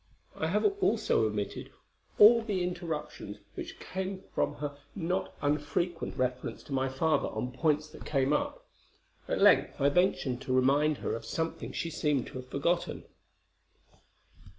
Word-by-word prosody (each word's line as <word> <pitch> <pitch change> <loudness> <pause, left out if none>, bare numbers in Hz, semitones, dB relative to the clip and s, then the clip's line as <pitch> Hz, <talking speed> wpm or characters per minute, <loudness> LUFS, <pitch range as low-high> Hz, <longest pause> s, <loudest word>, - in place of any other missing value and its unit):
I 160 - -1
have 205 +6 +1 0.2
also 220 - +3
omitted 105 -1 -4 0.5
all 230 +3 +9
the 205 -5 -1
interruptions 175 -4 -4 0.2
which - - -7
came 190 0 -4
from - - 0
her 145 -1 -4 0.2
not 180 +1 -1
unfrequent 150 +4 -1
reference 125 -1 -2
to 140 - -7
my 135 0 +1
father 155 +4 +1
on 125 - -3
points 150 +3 +1
that - - -11
came 135 -1 +1
up. - - -2 0.6
At - - -1
length - - +5
I 140 - +4
ventured 140 -7 +1
to 135 -1 -2
remind 140 +4 +3
her - - 0
of 115 - -4
something 160 +8 -3
she 165 - -3
seemed 150 -4 0
to 130 - -7
have 130 - -9
forgotten. 170 +7 -1
150 Hz, 150 wpm, -30 LUFS, 135-175 Hz, 0.6 s, all